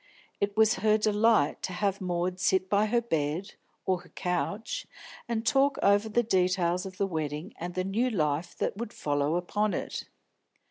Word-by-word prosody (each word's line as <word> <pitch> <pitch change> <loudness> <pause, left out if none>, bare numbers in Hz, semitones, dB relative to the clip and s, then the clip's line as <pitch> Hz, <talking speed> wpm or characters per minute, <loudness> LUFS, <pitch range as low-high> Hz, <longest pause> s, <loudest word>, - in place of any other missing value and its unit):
It 200 +1 -1
was 220 0 +5
her 215 0 +4
delight 215 -6 +3
to 185 - -3
have 200 +1 -1
Maud 180 0 -1
sit 185 0 +1
by 205 +1 +3
her 235 +2 +2
bed, 165 -2 -2 0.3
or 185 -1 +1
her 180 - -18
couch, 195 +4 -3 0.4
and 230 -1 -1
talk 275 +1 +3
over 205 +2 +4
the 240 +3 +2
details 180 -3 +1
of 185 -1 -10
the 200 - +1
wedding 155 +1 -4
and 175 +1 -5
the 185 - 0
new 220 +7 0
life 155 -6 -1
that - - -2
would 230 0 -5
follow 145 +2 0
upon 205 +4 0
it. - - -4
190 Hz, 175 wpm, -29 LUFS, 175-215 Hz, 0.4 s, was